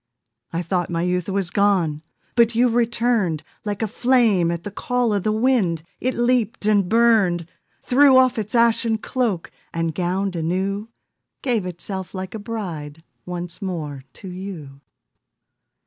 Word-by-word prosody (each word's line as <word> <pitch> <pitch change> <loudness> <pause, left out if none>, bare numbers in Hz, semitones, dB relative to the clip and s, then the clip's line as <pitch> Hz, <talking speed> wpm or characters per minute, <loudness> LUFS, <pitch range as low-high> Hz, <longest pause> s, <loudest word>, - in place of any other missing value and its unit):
I 170 +1 -2
thought 175 0 -1
my 170 -1 -1
youth 180 +1 -1
was 195 -2 -1
gone, 185 -7 +2 0.3
But 235 -1 +3
you 245 +2 +4
returned, 230 -8 +1 0.2
Like 205 0 -3
a - - +1
flame 230 -6 +3
at 170 0 -3
the 205 - -6
call 245 +2 0
of 200 - +1
the 215 - 0
wind 215 -8 +1 0.2
It 255 +1 -1
leaped 240 -3 +1
and 205 -4 +3
burned; 215 -7 +3 0.4
Threw 265 +1 +6
off 255 -2 +4
its 215 +2 -3
ashen 230 -1 +3
cloak, 220 -6 -2 0.2
And 165 -1 -1
gowned 185 +3 -1
anew 190 +6 -2 0.5
Gave 230 -8 0
itself 185 +2 -6
like 185 0 -5
a 220 - -5
bride 165 -9 -6 0.2
Once 175 +1 -5
more 155 -8 -4
to 195 - -11
you. 180 -7 -8
200 Hz, 145 wpm, -22 LUFS, 175-230 Hz, 0.5 s, Threw